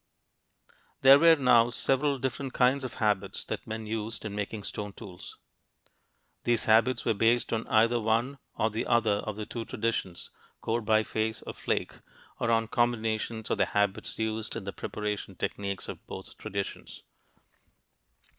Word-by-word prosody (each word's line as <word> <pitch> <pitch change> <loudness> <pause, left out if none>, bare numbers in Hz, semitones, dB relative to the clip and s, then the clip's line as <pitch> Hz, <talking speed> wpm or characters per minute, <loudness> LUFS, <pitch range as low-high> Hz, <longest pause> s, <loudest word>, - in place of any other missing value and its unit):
There 135 +1 +9
were 165 +1 +7
now 125 -4 +5
several 135 +3 +1
different 130 +1 -3
kinds 130 +2 +3
of 130 - -5
habits 105 -3 0
that - - -5
men 110 0 -5
used 110 +1 -4
in 105 - -4
making 105 +1 -4
stone 105 0 -5
tools. 95 -5 -11 1.1
These 120 -2 +2
habits 115 +3 +3
were - - +3
based 115 +4 +2
on 115 0 -2
either 115 +2 +4
one 115 +5 0 0.2
or 110 +1 +1
the 110 - -2
other 110 -3 +3
of 110 -1 -4
the 105 0 -5
two 115 +1 -5
traditions 110 -6 -3 0.3
core 115 +1 -1
biface 110 0 0
or - - -5
flake - - -2 0.4
or 115 - 0
on 115 -1 +2
combinations 115 -2 -1
of - - 0
the - - +4
habits 100 -1 0
used 110 0 -2
in 115 - -4
the 100 - -5
preparation 105 -2 -4
techniques 100 +1 -3
of - - -9
both - - -8
traditions. 100 0 -6
110 Hz, 155 wpm, -29 LUFS, 105-120 Hz, 1.1 s, There